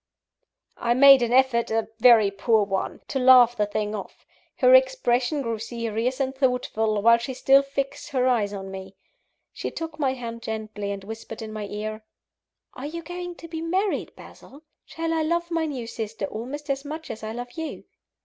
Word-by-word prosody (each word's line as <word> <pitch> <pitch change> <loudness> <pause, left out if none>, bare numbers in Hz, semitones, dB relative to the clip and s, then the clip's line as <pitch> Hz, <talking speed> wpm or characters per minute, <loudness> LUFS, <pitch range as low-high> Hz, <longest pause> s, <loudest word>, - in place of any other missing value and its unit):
I 240 0 +1
made 275 0 +8
an 240 -1 0
effort 255 -2 +3
a 225 -1 0
very 225 -4 +6
poor 215 +2 +2
one 195 -1 -3
to 270 - -2
laugh 250 -2 +7
the 210 -2 0
thing 210 0 -2
off. 205 - -8 0.3
Her - - +5
expression 305 - +3
grew 230 -2 -3
serious 230 +2 -3
and 265 -1 -1
thoughtful, 250 -5 0
while 235 +1 +6
she 255 +2 -5
still 270 +2 +5
fixed 275 +1 -4
her 260 -3 +1
eyes 220 -5 +1
on 195 -1 -7
me. 190 0 -9 0.6
She - - -4
took 325 -1 -7
my 270 -3 +1
hand 230 -2 -7
gently, 215 -2 -5
and 200 -1 -6
whispered 225 +1 -8
in 215 0 -7
my 210 -1 -5
ear: 215 +1 -5 0.7
"Are 270 - -6
you 335 +2 -6
going 355 +1 -6
to 335 - -11
be 325 -1 -6
married, 375 +5 -1
Basil? 285 +4 -15 0.2
Shall 330 0 -3
I 325 - +1
love 340 +2 -1
my 330 -1 0
new 260 -6 -5
sister 225 -2 -5
almost 265 +8 -5
as 275 0 -3
much 310 +2 -7
as 220 - -8
I 220 0 -5
love 245 +1 -6
you?" 320 +3 -6
245 Hz, 190 wpm, -25 LUFS, 220-290 Hz, 0.7 s, made